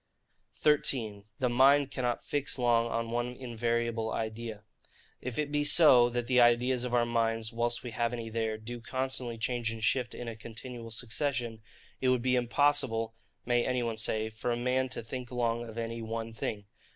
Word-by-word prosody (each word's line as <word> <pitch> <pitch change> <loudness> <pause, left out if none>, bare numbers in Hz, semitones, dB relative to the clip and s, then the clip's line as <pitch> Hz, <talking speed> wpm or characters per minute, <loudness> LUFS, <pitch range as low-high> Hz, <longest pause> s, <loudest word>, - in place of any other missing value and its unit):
13. 115 -9 +1
The 130 - +1
Mind 135 +3 +5
cannot 125 -2 -1
fix 145 -1 -2
long 120 -2 +3
on 115 0 -2
one 120 +1 -1
invariable 115 -2 -1
Idea. 110 -1 -4 0.6
If 125 -2 -5
it 150 -1 -1
be 145 0 +1
so, 135 -6 +7
that 120 0 -2
the 125 0 +3
ideas 120 +1 +4
of 125 -1 -1
our 120 -1 +4
minds, 115 -1 0
whilst 120 0 -1
we 120 - -5
have 115 +1 0
any 115 -2 -4
there, 110 -1 -1
do 120 +2 -7
constantly 130 -1 -2
change 120 +1 -1
and 115 -1 -6
shift 125 +2 +1
in 120 - -6
a 115 - -4
continual 115 +1 -8
succession, 120 0 -2 0.4
it 130 - +3
would 125 -2 +2
be 130 0 +3
impossible, 120 -2 +1 0.3
may 120 -1 +2
any 125 -1 0
one 115 -2 -2
say, 110 0 0
for 115 +3 -3
a 120 - 0
man 130 +2 +1
to 125 - -4
think 125 +2 -6
long 120 -1 -1
of 110 - -10
any 115 0 -3
one 115 0 -4
thing. 105 -1 -4
120 Hz, 185 wpm, -30 LUFS, 115-125 Hz, 0.6 s, so